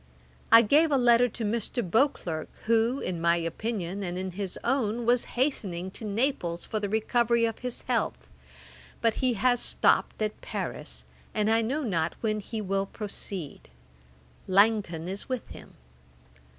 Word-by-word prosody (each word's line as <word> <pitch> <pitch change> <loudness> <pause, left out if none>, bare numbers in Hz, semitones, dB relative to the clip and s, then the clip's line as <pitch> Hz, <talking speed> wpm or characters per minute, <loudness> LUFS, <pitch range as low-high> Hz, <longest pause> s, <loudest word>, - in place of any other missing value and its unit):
I 230 0 +9
gave 300 +8 +4
a 280 - +4
letter 245 0 +5
to 225 0 -4
Mr. 230 0 -2
Beauclerk, 175 - 0 0.2
who, 230 +3 +3
in 175 -2 -3
my 170 0 +4
opinion, 185 +3 -3
and 180 -2 -3
in 185 0 -3
his 190 0 -4
own, 235 -2 0
was 240 +1 +3
hastening 190 - -1
to 220 - -9
Naples 205 -6 -1
for 215 - -2
the 205 -1 -2
recovery 230 +2 +2
of 225 -1 -3
his 250 -1 -4
health; 220 - -2 0.7
but 230 -1 +2
he 255 -2 +2
has 245 +3 +2
stopped - - +2
at 215 - -3
Paris, - - -5 0.3
and 215 +1 +2
I 225 0 +4
know 275 +7 -1
not 170 -8 -1
when 215 -2 0
he 220 +1 -5
will 195 0 -1
proceed. 195 -7 -6 0.8
Langton 195 -4 +2
is 195 +6 -6
with 255 -2 -3
him. - - -12
215 Hz, 155 wpm, -28 LUFS, 185-240 Hz, 0.8 s, I